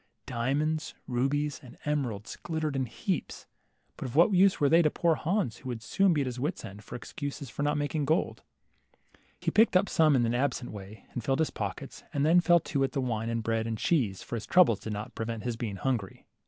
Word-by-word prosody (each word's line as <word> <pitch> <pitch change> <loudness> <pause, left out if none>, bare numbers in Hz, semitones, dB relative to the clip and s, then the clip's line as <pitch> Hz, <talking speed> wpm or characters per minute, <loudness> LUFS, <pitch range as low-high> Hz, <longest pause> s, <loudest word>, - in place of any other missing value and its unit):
Diamonds, 145 +6 -1
rubies, 140 +4 0
and 125 - -14
emeralds 125 -9 -2
glittered 160 -3 -3
in 130 -2 0
heaps, 175 - -3 0.5
but - - -4
of 125 - -8
what 175 +6 +5
use 190 +1 +5
were 145 - +4
they 165 +4 +6
to 155 - +3
poor 170 +2 +2
Hans, 170 - -1
who 130 - -8
would 115 -2 -5
soon 195 - +3
be 150 -4 +2
at - - 0
his 125 -1 -4
wits' 145 0 -2
end 105 0 -10
for - - -9
excuses 140 +1 -6
for - - -5
not 145 +1 +1
making 145 0 -1
gold? 160 +6 0 1.0
He - - -1
picked 220 -2 +4
some 155 -2 +4
up - - +4
in 120 - +2
an 115 - 0
absent 125 -1 -1
way, 100 0 -10
and 120 - -4
filled 135 0 +1
his 160 - +1
pockets, - - -5
and 140 0 +2
then 170 +3 +6
fell 175 -1 +5
to 140 -3 -1
at 135 - -1
the 140 - -1
wine 115 -3 -2
and 115 -1 -2
bread 115 0 0
and 110 -1 -2
cheese, 110 - 0
for - - -5
his 115 - -5
troubles 160 - +5
did 110 - -5
not 105 +4 -6
prevent 115 -1 -4
his 120 -2 -2
being 115 -3 -4
hungry. 110 -3 -3
135 Hz, 225 wpm, -29 LUFS, 115-155 Hz, 1.0 s, they